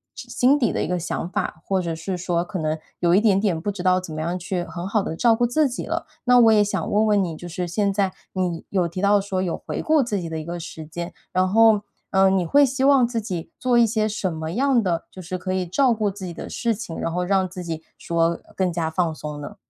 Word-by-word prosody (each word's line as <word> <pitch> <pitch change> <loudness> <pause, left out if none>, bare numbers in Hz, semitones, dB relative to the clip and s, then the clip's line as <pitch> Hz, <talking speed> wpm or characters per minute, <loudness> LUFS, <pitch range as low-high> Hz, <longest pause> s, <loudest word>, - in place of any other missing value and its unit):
之 - - -9
心 265 +4 +3
底 240 - +2
的 - - -1
一 - - -2
个 180 0 -1
想 170 0 -3
法， 160 - -3
或 190 -1 +1
者 170 -2 -3
是 180 +3 -4
说 175 -1 0
可 185 0 -5
能 155 0 -1 0.2
有 170 -1 +3
一 - - +6
点 210 -3 +3
点 195 -6 0
不 205 +5 -2
知 195 -2 -6
道 185 0 +4
怎 175 -3 -8
么 155 - -4
样 170 +3 -2
去 180 0 -3
很 175 +1 -6
好 215 +1 +1
地 160 - -4
照 230 +4 +4
顾 240 +1 +2
自 300 +5 +2
己 250 - -5
了。 - - -2 0.2
那 250 0 +6
我 225 -2 +7
也 210 -1 +5
想 195 -5 -2
问 215 +1 +3
问 205 -2 +3
你 170 -3 -3
就 175 - -9
是 175 +1 -4
现 200 +4 0
在 195 -1 0 0.2
你 180 -3 -2
有 180 -3 +1
提 175 +3 -5
到 200 +1 +4
说 195 -1 -2
有 180 -3 -2
回 - - -3
顾 310 -1 +3
自 210 -4 -2
己 165 - -5
的 160 - -4
一 155 - -7
个 175 +1 -5
时 160 -1 -8
间， 170 +3 -6 0.2
然 185 0 +3
后， 220 0 +5 0.3
呃， 190 0 +5
你 190 -2 +1
会 285 - +5
希 265 +1 -2
望 275 -3 +6
自 235 -1 -2
己 180 -6 -5
做 250 -1 +2
一 235 - +6
些 215 -1 0
什 200 -4 -2
么 160 +1 -4
样 260 +1 +3
的 175 -4 -1
就 185 - -10
是 180 +2 -4
可 185 +1 -4
以 185 -1 0
照 250 +7 +3
顾 215 -2 0
自 195 -1 -7
己 175 - -6
的 - - -7
事 235 -1 0
情， 195 -6 -6
然 165 - -2
后 180 +2 -1
让 190 0 +2
自 180 - -7
己 165 -2 -5
说 170 0 0 0.2
更 185 -2 +1
加 165 -1 -1
放 165 0 0
松 150 -1 -7
呢？ 145 - -8
185 Hz, 295 characters per minute, -23 LUFS, 170-215 Hz, 0.3 s, 我